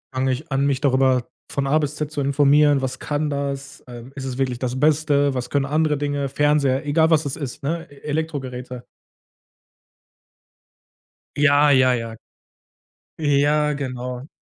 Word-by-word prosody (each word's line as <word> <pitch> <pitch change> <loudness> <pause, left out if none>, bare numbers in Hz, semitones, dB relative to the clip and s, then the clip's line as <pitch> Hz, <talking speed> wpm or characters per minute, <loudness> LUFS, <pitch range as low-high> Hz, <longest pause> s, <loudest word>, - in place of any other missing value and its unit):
fange 130 0 +1
ich 145 +4 -5
an, 135 +1 +1
mich 135 -2 0
darüber 130 -3 +2 0.2
von 140 -1 -1
A 155 +3 +3
bis 150 0 -3
Z 150 0 -4
zu 150 - -4
informieren 145 0 +4
was 130 0 -4
kann 150 0 -2
das, 140 0 -4
äh, 120 -1 -9
ist 135 -1 -6
es 130 -1 -5
wirklich 130 -3 -1
das 130 0 -3
Beste? 145 -2 +2
Was 125 -1 -4
können 140 -1 0
andere 150 0 +1
Dinge? 145 -1 -2
Fernseher 145 -1 +1
egal, 160 +2 +3
was 160 -2 +3
es 140 - -3
ist, 140 -1 -7
ne? 165 +3 -3
E - - -15
Elektrogeräte. 130 -5 -4 2.5
Ja, 145 0 +4
ja, 130 -1 +4
ja, 115 -1 -5 1.0
Ja, 150 0 +2
genau. 125 -1 -5
140 Hz, 155 wpm, -22 LUFS, 130-150 Hz, 2.5 s, informieren